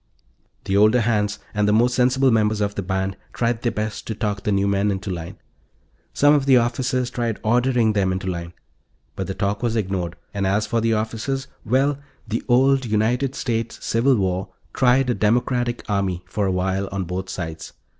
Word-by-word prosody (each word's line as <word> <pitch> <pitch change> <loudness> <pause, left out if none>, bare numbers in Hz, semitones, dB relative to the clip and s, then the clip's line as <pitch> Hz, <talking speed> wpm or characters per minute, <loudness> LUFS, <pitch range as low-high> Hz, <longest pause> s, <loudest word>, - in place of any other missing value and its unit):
The 95 - -1
older 110 +4 +5
hands, 105 -2 0 0.2
and 105 -1 +1
the - - +3
more 115 +3 +5
sensible 130 +2 +2
members 110 -1 +2
of 100 -1 0
the 100 - -3
band, 95 0 -2 0.2
tried 115 -1 0
their 120 - 0
best 105 0 -4
to 110 - -3
talk 105 -2 -2
the 105 - -1
new 100 0 +2
men 100 +1 +1
into 95 0 -3
line. 90 +3 -6 0.7
Some 145 +1 +4
of 140 -2 +2
the 130 -2 +7
officers 125 +1 0
tried 120 -4 -2
ordering 120 0 +2
them 95 -2 +1
into 95 0 -3
line. 85 -2 -4 0.6
But 95 - -4
the 95 - -4
talk 100 0 -1
was 120 -2 0
ignored. 95 -5 -2 0.2
And 100 -1 -1
as 105 +3 +1
for 115 +2 0
the 115 0 +2
officers 115 +5 -2 0.2
well, 135 +5 +1 0.3
the 110 +1 -2
old 135 +2 +4
United 120 +5 0
States 115 -2 -2
Civil 125 +4 +3
War 95 -2 -1 0.2
tried 130 0 +3
a - - +2
democratic 120 +2 0
army 95 -4 -1
for 105 +1 -1
a - - +1
while, 95 +1 -1
on 100 -1 -2
both 90 +2 -4
sides. 80 -2 -6
110 Hz, 190 wpm, -22 LUFS, 95-120 Hz, 0.7 s, the